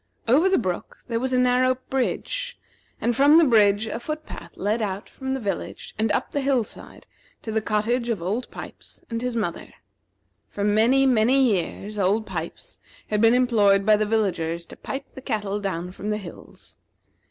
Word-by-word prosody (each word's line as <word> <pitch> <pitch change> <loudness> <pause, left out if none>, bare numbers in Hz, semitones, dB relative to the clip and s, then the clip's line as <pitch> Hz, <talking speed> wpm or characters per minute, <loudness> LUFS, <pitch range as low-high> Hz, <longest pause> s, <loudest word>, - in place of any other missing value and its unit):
Over 300 +11 +5
the 380 - +3
brook 185 -6 -3
there 230 -1 0
was 260 +2 -2
a 255 - +2
narrow 250 +1 +3 0.2
bridge, - - -2 0.4
and 240 0 0
from 290 +5 +6
the 335 - +7
bridge 215 -5 +4
a 220 +1 -4
foot 305 +5 -5
path - - -9
led 210 +4 -1
out 200 -1 -3
from 265 0 -4
the - - -3
village 205 -5 -5
and 220 0 +2
up - - -1
the 285 - -1
hill 270 -3 +2
side, - - -10 0.4
to 220 - -4
the 220 0 0
cottage 230 +3 0
of 225 -5 0
Old 205 +9 -3
Pipes - - -10
and 230 0 -2
his 250 -1 -2
mother. 200 -7 -3 0.7
For 200 - -4
many, 225 +6 +4
many 250 +1 +4
years, 210 -2 0
Old 200 +3 +2
Pipes - - -6 0.3
had 210 -1 +1
been 230 +1 +6
employed 210 -6 +3
by 215 0 +6
the 210 0 0
villagers 170 -6 -1
to - - -12
pipe 275 +1 -6
the 265 - -11
cattle 210 -4 -2
down 180 -3 -3
from 200 +3 -6
the 210 - 0
hills. 195 -5 -11
225 Hz, 185 wpm, -24 LUFS, 205-255 Hz, 0.7 s, the